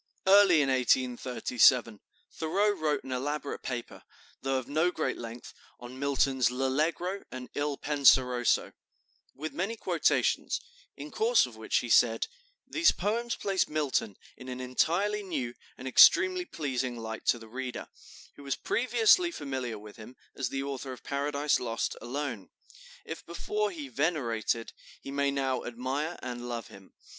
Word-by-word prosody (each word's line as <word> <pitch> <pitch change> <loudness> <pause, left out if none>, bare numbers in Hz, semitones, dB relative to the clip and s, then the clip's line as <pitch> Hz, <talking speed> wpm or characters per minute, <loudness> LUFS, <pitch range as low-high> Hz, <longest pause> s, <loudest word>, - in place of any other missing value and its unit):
'" - - -50
Early 190 -5 +6
in 135 - 0
1837 125 -2 +2 0.3
Thoreau 195 +6 +1
wrote 155 -6 -1
an 130 - -8
elaborate 140 +3 -3
paper, 120 -2 -5 0.4
though 135 0 0
of 130 -1 -4
no 155 +5 +2
great 160 -3 -2
length, 115 +1 -8 0.3
on 120 +2 -10
Milton's 135 -2 +2
"L'Allegro" 155 +9 -1
and 130 -1 -7
"Il 145 -1 -2
Penseroso," 130 -4 +3 0.6
with 155 +4 -5
many 195 +6 -2
quotations, - - +1 0.4
in - - -8
course 460 +2 +3
of - - -11
which - - -1
he - - -6
said: - - +4 0.4
"These 330 -1 +4
poems 230 +5 -1
place 195 -2 0
Milton 145 -9 -1 0.2
in 130 0 -10
an 125 0 -5
entirely 170 +11 0
new 145 -11 -3 0.2
and 130 - -7
extremely 365 - +6
pleasing 130 - -3
light 110 -1 -7
to - - +4
the 115 -1 -12
reader, 125 +2 -5 0.5
who - - -12
was 140 -1 -2
previously 245 +8 +3
familiar 130 - -4
with 105 +1 -12
him 115 +3 -11 0.2
as 130 -3 -2
the 135 0 -3
author 135 -1 -5
of 125 - -13
'Paradise 145 +1 0
Lost' 115 -2 -2
alone. 125 -4 -4 0.6
If - - -7
before 210 +5 -2
he 155 -7 -7
venerated, 120 -6 -1 0.3
he 135 - -8
may 140 0 +1
now 135 -2 -1
admire 130 +7 -3
and 120 -1 -5
love 115 -2 -5
him. 95 -1 -15
135 Hz, 150 wpm, -29 LUFS, 125-160 Hz, 0.6 s, Early